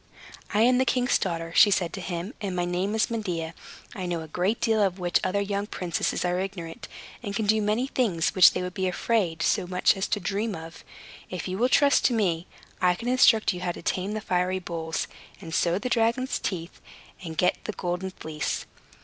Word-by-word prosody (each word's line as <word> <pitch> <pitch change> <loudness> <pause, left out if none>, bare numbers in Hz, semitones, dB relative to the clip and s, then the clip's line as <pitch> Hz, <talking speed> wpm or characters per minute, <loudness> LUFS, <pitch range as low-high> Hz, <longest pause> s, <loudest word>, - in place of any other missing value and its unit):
"I 210 - +2
am 250 +1 +4
the - - +4
king's 255 0 +2
daughter," 165 -3 -3
she 210 - +8
said 180 -4 +1
to 195 - -5
him, 180 +5 -4
"and 195 -3 -3
my 175 -1 0
name 180 +4 -1
is 220 +1 +1
Medea. 175 -8 -3 0.4
I 185 -2 -4
know 170 -2 -2
a 160 - -8
great 180 +8 0
deal 225 -2 +2
of 195 -2 +1
which 175 -2 +1
other 190 +2 +1
young 200 0 -2
princesses 180 -2 -2
are 180 0 0
ignorant, 190 +1 -5 0.3
and 200 -4 -5
can 220 - 0
do 215 +1 +3
many 210 +4 +1
things 215 -12 0
which 185 -2 +8
they 180 - -2
would 180 0 -4
be 190 0 -1
afraid 180 -4 0
so 180 - +1
much 180 0 +3
as 195 +1 -2
to 210 - 0
dream 200 +3 -2
of. 165 0 -10 0.5
If 180 0 -5
you 185 +2 -3
will 250 +2 +3
trust 280 +1 +4
to 250 - +4
me, 180 -5 0 0.3
I 180 -1 +4
can 235 +6 -4
instruct 230 -5 +5
you 180 - -6
how 175 -1 -1
to - - -10
tame 190 +3 -1
the 215 - -3
fiery 180 0 0
bulls, 165 -3 -3 0.3
and 165 -4 -9
sow 170 +1 +2
the 250 - -3
dragon's 240 +2 +1
teeth, 170 -3 -5 0.4
and 160 -2 -7
get 180 - +2
the - - -2
Golden 180 +1 -3
Fleece." 155 -4 -4
185 Hz, 215 wpm, -26 LUFS, 175-215 Hz, 0.5 s, she